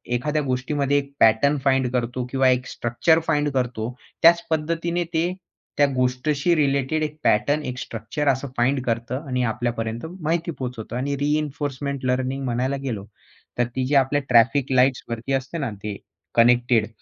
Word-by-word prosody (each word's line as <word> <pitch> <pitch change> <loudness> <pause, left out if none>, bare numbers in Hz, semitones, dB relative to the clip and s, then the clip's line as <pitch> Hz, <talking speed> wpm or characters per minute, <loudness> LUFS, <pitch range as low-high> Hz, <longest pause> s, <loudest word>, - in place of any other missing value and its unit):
एखाद्या 150 +5 0
गोष्टीमध्ये 140 +2 0
एक 140 0 -3
पॅटर्न 115 +7 +4
फाइंड 130 -2 +2
करतो 125 0 -1
किंवा 135 -1 +3
एक 125 0 +1
स्ट्रक्चर 140 +8 +1
फाइंड 150 -2 +2
करतो. 125 -2 -2 0.3
त्याच 170 +1 +7
पद्धतीने 170 +2 -1
ते 170 +3 +1 0.4
त्या 145 - +6
गोष्टीशी 140 +6 +1
रिलेटेड 140 +1 +1
एक 150 0 -4
पॅटर्न 145 +8 +2
एक 125 - -4
स्ट्रक्चर 115 +5 -4
असं 135 0 +1
फाइंड 130 +3 +2
करतं 120 +5 -2
आणि 125 -1 0
आपल्यापर्यंत 115 +1 -2 0.2
माहिती 165 +2 -1
पोहोचवतं 125 -5 -6
आणि 140 +2 -1
रिइन्फोर्समेंट 145 -2 -2
लर्निंग 130 +2 -1
म्हणायला 125 +2 -1
गेलो, 110 -7 -4 0.5
तर 120 - +2
ती 130 -1 0
जे 145 - +1
आपल्या 140 +1 +3
ट्रॅफिक 130 +3 +4
लाईट्सवरती 125 -1 +1
असते 135 +5 -2
ना, 140 -6 -2
ते 105 -1 -3 0.4
कनेक्टेड, 120 -1 +4
130 Hz, 150 wpm, -23 LUFS, 125-145 Hz, 0.5 s, त्याच